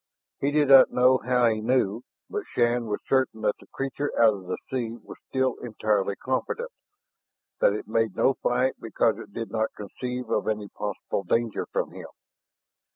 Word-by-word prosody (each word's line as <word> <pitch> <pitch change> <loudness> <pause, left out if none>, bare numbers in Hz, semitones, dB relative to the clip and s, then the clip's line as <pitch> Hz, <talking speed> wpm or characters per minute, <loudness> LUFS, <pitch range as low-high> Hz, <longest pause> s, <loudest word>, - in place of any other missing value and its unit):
He 140 - +1
did 145 -1 +2
not 135 -1 +9
know 130 +1 +4
how 125 0 +2
he 110 -2 +2
knew, 115 -2 +1 0.3
but - - -3
Shann 120 0 +1
was 105 - -2
certain 130 -4 +1
that 105 - +1
the - - -17
creature 135 +2 -3
out 115 -2 +6
of 95 -3 -9
the 90 - -2
sea 120 -3 -3
was - - -11
still 130 -1 0
entirely 105 -4 0
confident, 470 - -3 0.9
that - - +4
it - - -5
made 115 -3 0
no 135 - +3
fight 125 +1 +1
because 115 -2 0
it - - -10
did 115 +2 -5
not 110 -1 -1
conceive 125 +5 -5
of - - 0
any 105 -2 -2
possible 105 -1 -4
danger 115 +4 0
from - - -1
him. - - -9
120 Hz, 175 wpm, -26 LUFS, 110-130 Hz, 0.9 s, not